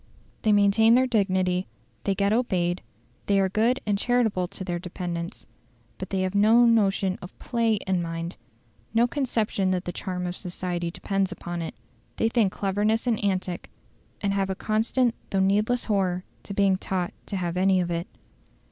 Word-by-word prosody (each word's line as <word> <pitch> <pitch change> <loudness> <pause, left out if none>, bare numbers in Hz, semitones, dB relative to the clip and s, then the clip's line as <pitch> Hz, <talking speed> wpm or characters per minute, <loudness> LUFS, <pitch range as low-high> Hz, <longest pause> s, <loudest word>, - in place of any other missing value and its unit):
They 215 - +3
maintain 210 +3 +5
their 255 +1 +4
dignity; 185 -5 +1 0.4
they 195 - +1
get 200 +2 +2
obeyed; 180 -7 0 0.5
they 200 -1 +3
are 190 -1 +2
good 230 +6 +2
and 205 -2 +1
charitable 225 -7 +1
to 195 +1 -7
their 175 -1 -2
dependants. 175 -1 -5 0.5
But 190 - -5
they 190 -1 0
have 185 0 -1
no 220 +4 +6
notion 195 -4 +2
of 180 - -10
PLAY 230 -3 +1
of 190 -2 +1
mind: 165 +1 -4 0.6
no 230 +1 +5
conception 230 -7 0
that 185 -1 -1
the 175 - -2
charm 180 0 -4
of 175 0 -3
society 175 -2 -3
depends 195 +2 -1
upon 175 0 -5
it. 165 - -5 0.4
They 225 - +1
think 225 -5 +2
cleverness 205 +4 0
an 235 -3 +1
antic, 185 -3 -2 0.5
and 200 -1 0
have 195 -1 0
a 190 - -1
constant 225 +4 +1 0.2
though 195 - 0
needless 210 +6 +2
horror 185 -4 0 0.3
of 200 - -4
being 195 -2 +3
thought 185 -2 -2
to 200 - -3
have 175 -2 -2
any 190 +1 +3
of 175 -1 -1
it. 170 0 -2
195 Hz, 175 wpm, -26 LUFS, 180-215 Hz, 0.6 s, no